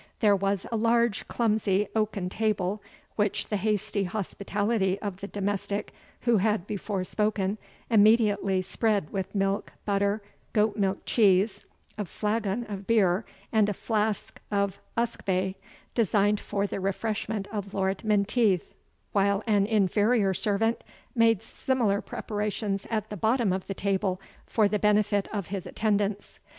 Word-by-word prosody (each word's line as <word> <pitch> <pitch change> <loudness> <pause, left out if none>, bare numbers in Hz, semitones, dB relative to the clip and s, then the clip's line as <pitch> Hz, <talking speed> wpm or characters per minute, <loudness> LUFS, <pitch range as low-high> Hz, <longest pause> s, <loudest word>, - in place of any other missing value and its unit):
There 205 -2 +5
was 195 0 0
a - - 0
large 235 -1 +2
clumsy 210 -3 +1
oaken 215 -4 0
table, 205 0 -1 0.4
which 205 -2 0
the 210 - 0
hasty 205 0 0
hospitality 200 +1 -1
of 200 -3 -4
the 200 - -6
domestic 200 0 -2 0.3
who 235 -2 +3
had 210 -1 +1
before 205 -2 -3
spoken, 210 +1 0 0.3
immediately 205 -3 +4
spread 200 -3 0
with 195 +1 -4
milk, 195 0 0
butter, 200 +1 +1 0.3
goat 210 0 +2
milk 195 -2 -1
cheese, 200 -1 +3 0.3
a 210 - -1
flagon 210 +3 -1
of 200 -2 -7
beer, 200 -3 +3 0.3
and 215 -2 +3
a 205 - -2
flask 215 0 -1
of 200 -2 0 0.2
usquebae, 190 -5 0 0.4
designed 210 -2 +2
for 200 0 -2
the 200 - -3
refreshment 200 +1 -2
of 205 -2 -5
Lord 190 +1 0
Menteith; 210 -2 +2 0.4
while 200 +1 +2
an 205 -3 +3
inferior 210 0 +3
servant 220 +4 0 0.3
made 230 -4 +3
similar 230 -7 0
preparations 210 -1 -3
at 215 -2 -2
the 210 - -4
bottom 220 0 +2
of 185 0 -3
the 195 - -4
table 190 -1 0 0.3
for 215 -2 +3
the 210 +1 0
benefit 210 -1 +2
of 200 -5 -3
his 195 -2 -4
attendants. 205 -2 -1
205 Hz, 140 wpm, -27 LUFS, 195-215 Hz, 0.4 s, There